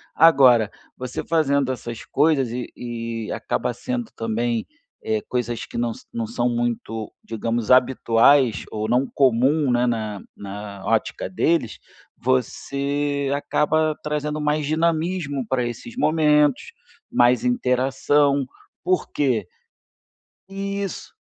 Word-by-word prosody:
Agora, 130 -9 +6 0.3
você, 125 0 -5
fazendo 140 -5 +1
essas 120 -2 -6
coisas 145 -3 +2
e 125 0 -5
e 115 -2 -5
acaba 125 - -2
sendo 240 - -4
também, 115 +1 -1 0.4
eh, 110 -1 0
coisas 120 -2 -2
que - - -8
não 120 -1 0
sã - - -14
não 115 -1 -2
são 120 +2 0
muito, 120 -2 -3
digamos, 115 0 -3
habituais 125 -2 +4
ou 110 0 -3
não 125 +3 +3
comum, 135 +2 +2
né, 120 0 +2
na 110 -4 -2
na 100 0 -8
ótica 110 +1 -1
deles, 165 -10 0 0.4
você 140 +3 -1
acaba 155 +2 +1
trazendo 150 0 -2
mais 150 0 0
dinamismo 160 -2 0
pra 130 0 0
esses 120 - -7
momentos, 150 - +2 0.4
mais 120 -1 +4
interação. 135 +3 +2 0.4
Por 185 +1 0
quê 120 -9 0 1.0
Isso. 200 0 -5
130 Hz, 115 wpm, -23 LUFS, 115-150 Hz, 1.0 s, Agora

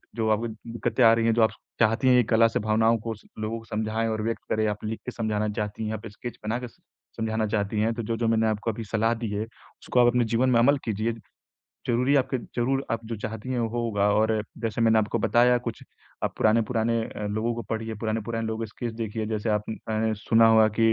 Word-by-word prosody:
जो 110 -1 0
आपको 110 +2 +1
दिक्कतें 115 +2 -2
आ 115 - +8
रही 115 0 +1
हैं, 115 - +4
जो 115 - +2
आप 110 - +3 0.3
चाहती 115 +3 +3
हैं 125 - +6
कि 125 - +5
कला 115 0 +5
से - - -1
भावनाओं 110 +2 +3
को 115 +1 -4
स 105 - -20
लोगों 110 +1 -2
को 115 - -15
समझाएँ 110 +1 -1
और 110 -1 -2
व्यक्त 115 0 -2
करें। 110 0 +2
आप 105 0 -3
लिख 110 +1 -3
के 125 - -4
समझाना 110 -2 -1
चाहती 105 +1 -3
हैं, 110 - -2
आप 110 +1 -6
स्केच 115 +3 -8
बनाके 120 +3 -2
समझाना 110 -1 -5
चाहती 105 0 -1
हैं 115 +2 +1
तो 115 0 -4
जो-जो 115 +1 -1
मैंने 110 0 +2
आपको 110 +1 -1
अभी 115 +1 -6
सलाह 115 +2 +1
दी 115 -1 -4
है, 105 +1 -1
उसको 115 +2 -5
आप 120 - +6
अपने 120 0 +3
जीवन 120 +3 +2
में 120 - +4
अमल 140 +5 +5
कीजिए। 110 +1 -1 0.8
ज़रूरी 125 +4 +2
आपके 130 -1 +1
ज़रूर 130 +3 -1
आप 115 0 -2
जो 115 0 -4
चाहती 110 +3 -6
हैं 125 -2 0
वो 115 - 0
होगा 105 -3 +1
और 110 +1 +2 0.2
जैसे 115 0 -2
मैंने 115 -1 +5
आपको 110 +2 0
बताया 120 +3 +4
कुछ 115 -2 -6 0.4
आप - - -1
पुराने-पुराने 115 +1 +2
अ, 105 - -6
लोगों 110 +3 -1
को 120 - -4
पढ़िए। 110 0 -3
पुराने-पुराने 115 +1 -2
लोगों 110 +1 -2
के - - -7
स्केच 115 +2 -5
देखिए। 110 -1 -3
जैसे 110 0 -2
आपने 110 +1 -1
अ, - - 0
सुना 115 +2 +4
होगा 110 -1 +6
कि 115 0 +5
115 Hz, 230 wpm, -26 LUFS, 110-115 Hz, 0.8 s, आ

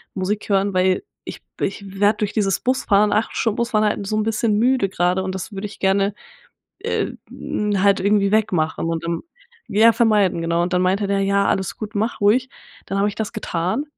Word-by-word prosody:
Musik 200 +2 -2
hören, 195 0 +1
weil 185 - +2 0.2
ich - - -8 0.2
ich 200 +1 -2 0.2
werde 205 +1 +3
durch 210 0 -1
dieses 195 -4 +1
Busfahren, 210 -5 +2
8 215 +2 0
Stunden 225 -2 0
Bus 235 0 -1
fahren 215 -1 +2
halt 205 -1 -1
so 215 - -1
'n 215 - +1
bisschen 215 -1 0
müde 245 -4 +2
grade 180 +1 0
und 185 0 -3
das 190 - -6
würde 195 +1 -5
ich 205 - -14
gerne, 195 +1 +2 0.7
äh, - - -2 0.2
hm, 205 -2 -2
halt 200 -1 +4
irgendwie 200 0 +2
wegmachen 175 -7 +1
und, 165 0 -2
ähm, 170 0 -2 0.5
ja 220 +3 +5
vermeiden“, 210 -7 +2
genau. 170 +1 0
Und 180 +1 -2
dann 180 - +2
meinte 195 +2 +1
der: 200 0 +1
„Ja, 200 0 +2
alles 190 -1 -1
gut, 215 0 -7
mach 220 +2 -2
ruhig.“ 245 +5 +3 0.4
Dann 195 - -2
habe 205 +1 +2
ich 205 - -5
das 220 -2 -3
getan 180 - -2
200 Hz, 205 wpm, -21 LUFS, 190-215 Hz, 0.7 s, ja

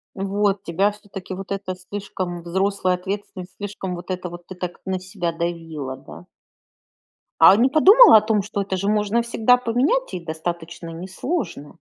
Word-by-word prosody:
Вот 200 0 0
тебя 190 +5 +1
всё-таки 195 -2 -9
вот 195 +1 -6
эта 195 -2 -4
слишком 185 -2 -6
взрослая 190 +1 0
ответственность, 190 0 -6
слишком 195 -2 -5
вот 175 +2 -9
это 180 -1 -3
вот 175 0 -11
ты 185 - -9
так 180 -1 -6
на 190 -1 -1
себя 185 -2 -4
давила, 165 -5 -4
да? 80 - -13 1.2
А 185 +4 +9
не 250 +4 +4
подумала 390 - +8
о - - +8
том, 215 -1 +1
что 205 0 -3
это 190 -1 -3
же 200 +2 -2
можно 210 +2 +1
всегда 235 +1 +3
поменять 250 - 0
и - - -3
достаточно 170 +1 -5
несложно? 180 - -5
190 Hz, 165 wpm, -22 LUFS, 175-205 Hz, 1.2 s, А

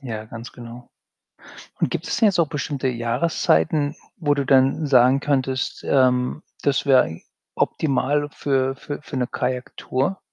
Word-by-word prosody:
Ja, 110 -5 -6
ganz 115 +2 -9
genau 120 0 -11 0.9
und - - +1
gibt - - -4
es - - -1
denn 220 - +4
jetzt 185 -4 +3
auch 160 - +2
bestimmte 140 -3 -2
Jahreszeiten, 130 - +1 0.2
wo 145 -4 +1
du 140 - -1
dann 135 +3 +3
sagen 130 0 +5
könntest, 130 -2 -1
ähm, 130 +2 +2 0.2
das 140 0 +1
wäre 130 -2 +6
eig 80 +1 -7 0.3
optimal 145 0 0
für 135 -1 0
für 145 +1 -7
für 150 - -7
'ne 125 -1 0
Kajaktour? 130 +7 -2
135 Hz, 150 wpm, -22 LUFS, 125-145 Hz, 0.9 s, wäre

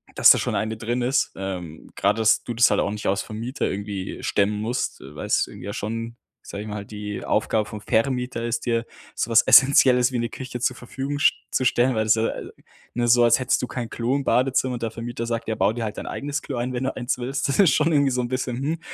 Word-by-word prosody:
dass - - +7
da - - +8
schon - - -2
eine 110 0 -2
drin 120 +3 -2
ist. 130 +4 +1
Ähm, 90 -5 -6
gerade, 105 +2 +1
dass 110 - +3
du 120 - -4
das 120 +1 +5
halt - - +2
auch 100 - -1
nicht 105 0 -6
als 100 +1 +1
Vermieter 115 +6 -4
irgendwie 100 -1 -5
stemmen 105 +1 0
musst, 120 +4 -2
weil - - -8
es - - +2
irgendwie - - -11
ja 100 - -4
schon, 115 +2 -5 0.3
sage 100 +1 -7
ich - - -9
mal, 105 -1 -5
die 105 -1 -6
Aufgabe 110 -2 0
vom 105 - -7
Vermieter 125 +2 -1
ist 115 0 -2
dir 115 -1 0 0.3
sowas 115 -2 +3
essenzielles 130 -2 +6
wie 125 - -1
'ne 120 - -1
Küche 125 0 -7
zur - - 0
Verfügung 135 +3 -5
sch - - +5 0.2
zu 130 - 0
stellen, 125 0 +2
weil 110 - +1
das, 110 - +4
ja, 115 0 0 0.6
ne, 120 0 0
so, 120 0 +6
als 120 0 +5
hättest 130 - +1
du 125 - -2
kein 120 -2 -5
Klo 120 +4 -1
im 140 - -1
Badezimmer 130 0 +1
und 115 - -6
der 115 - -2
Vermieter 115 +1 -5
sagt: 115 -1 -3
„Ja, 110 - -1
bau 100 +3 +2
dir 120 -1 -4
halt 105 -1 -4
dein - - -6
eigenes 145 0 -3
Klo 135 - -6
ein, 125 +2 -2
wenn 125 +2 -2
du - - -2
eins 125 +1 -2
willst.“ 130 +3 -2
Das 140 - 0
ist 190 -6 +6
schon 155 +2 +2
irgendwie 140 -2 +3
so 125 0 0
'n 120 - -4
bisschen, 130 -1 -2
hm. 155 +5 -2
120 Hz, 250 wpm, -23 LUFS, 110-130 Hz, 0.6 s, da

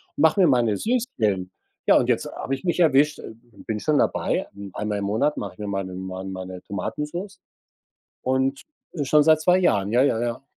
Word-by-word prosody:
mache 160 +5 +3
mir 180 - +6
meine 120 -6 +3
Süßquellen.“ 110 - -1 0.4
Ja, - - +7
und - - +1
jetzt - - +1
habe 135 - -2
ich 135 - -12
mich 175 0 -1
erwischt 150 -2 +3 0.5
bin 110 -1 -2
schon 150 +6 +1
dabei, - - 0 0.3
einmal 105 -1 -2
im 100 - -3
Monat 115 +9 0
mache - - -5
ich - - -26
mir 105 - -4
meine 95 -2 -3
mein 95 +1 -6
meine 95 -1 -7
Tomatensoße 170 - -5 0.8
und, 130 +1 0 0.3
äh, 150 -5 -2
schon 150 +2 +4
seit 155 0 +5
2 180 +3 +4
Jahren, 100 - +2
ja, 125 +2 +4
ja, 125 -5 +2
ja. 120 +1 -3
130 Hz, 185 wpm, -24 LUFS, 100-155 Hz, 0.8 s, Ja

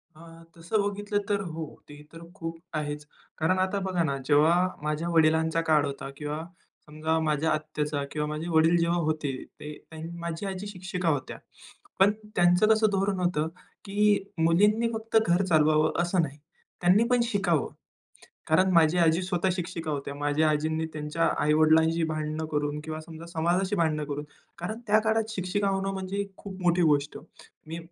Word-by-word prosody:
अं, 165 +1 -14
तसं 170 +6 0
बघितलं 205 +1 -1
तर 200 -1 +1
हो. 165 -4 -5 0.2
ते 145 0 -11
तर 165 - -10
खूप 165 -3 -6 0.2
आहेच. 150 -1 -3 0.3
कारण 165 +4 +1
आता 190 +2 0
बघा 180 -2 +1
ना, 140 -3 -1
जेव्हा 150 +4 +5 0.3
माझ्या 155 +3 -2
वडिलांचा 160 0 +3
काळ 150 -2 +4
होता 140 -1 -5
किंवा 150 +1 -4 0.5
समजा 155 +2 -1
माझ्या 155 0 +1
आत्याचा 150 -1 -2
किंवा 150 0 -2
माझे 150 +2 -4
वडील 165 +1 +4
जेव्हा 170 +1 +1
होते, 155 -4 -1
ते 155 +2 -10
माझी 170 +2 -4
आजी 195 +1 -4
शिक्षिका 180 -3 -3
होत्या. 145 -3 -2 0.6
पण 195 +2 +6 0.2
त्यांचं 180 +3 +4
कसं 220 0 +4
धोरण 195 -1 0
होतं, 175 -4 0 0.4
की 205 0 +2 0.2
मुलींनी 205 +8 +3
फक्त 225 0 0
घर 175 +3 +3
चालवावं, 155 -2 +3
असं 175 +1 +1
नाही. 145 -2 -4 0.4
त्यांनी 185 +5 +5
पण 245 -1 +3
शिकावं. 190 - +1 0.8
कारण 185 +4 +3
माझी 165 0 +4
आजी 165 +1 +3
स्वतः 180 0 0
शिक्षिका 170 -3 -4
होत्या. 140 -1 -4
माझ्या 145 +2 +1
आजींनी 155 +1 0
त्यांच्या 150 +2 -1
आई-वडिलांशी 160 +2 +4
भांडणं 155 0 -3
करून 145 0 -1
किंवा 155 0 -5
समजा 160 +1 -10
समाजाशी 175 +4 0
भांडणं 155 -3 +1
करून. 145 0 -4 0.3
कारण 215 +7 -5
त्या 215 0 +5
काळात 220 0 +1
शिक्षिका 200 0 -1
होणं 195 0 -1
म्हणजे 195 +1 -3
खूप 190 -2 -9
मोठी 175 0 +3
गोष्ट. 150 -2 +2 0.5
मी 165 +2 -6
165 Hz, 160 wpm, -27 LUFS, 155-185 Hz, 0.8 s, पण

